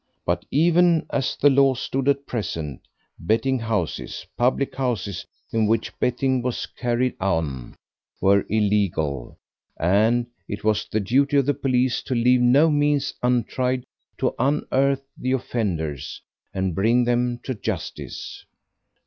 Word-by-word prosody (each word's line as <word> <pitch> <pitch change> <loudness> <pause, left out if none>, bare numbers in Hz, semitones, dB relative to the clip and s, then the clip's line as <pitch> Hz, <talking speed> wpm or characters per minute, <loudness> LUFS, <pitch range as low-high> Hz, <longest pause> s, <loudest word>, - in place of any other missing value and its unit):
But 85 0 -1
even 170 +2 +3
as 135 -2 0
the 145 - +4
law 135 -1 +4
stood 135 +2 -1
at 140 0 +1
present, 80 - -4 0.3
betting 120 +8 +1
houses, 110 -8 -3
public 130 +3 +1
houses 115 -8 -3 0.3
in 110 -1 +2
which 115 +1 0
betting 130 +1 +1
was 125 0 -2
carried 120 +1 -1
on, 80 -10 -2 0.4
were 100 +1 +4
illegal, 100 - 0 0.4
and 110 +8 +3 0.2
it 100 +1 -6
was 105 -1 +1
the 110 - -1
duty 140 +8 +2
of 140 - +3
the 145 - +2
police 130 -2 +1
to 130 - -3
leave 125 +1 +4
no 140 +6 +5
means 145 -1 +1
untried 125 +1 0 0.3
to - - 0
unearth 135 0 +1
the 130 +1 -2
offenders 90 - -3 0.3
and 95 -2 -1
bring 115 +8 +3
them 120 0 0
to 130 - -3
justice. 105 - -6
120 Hz, 130 wpm, -23 LUFS, 100-135 Hz, 0.4 s, no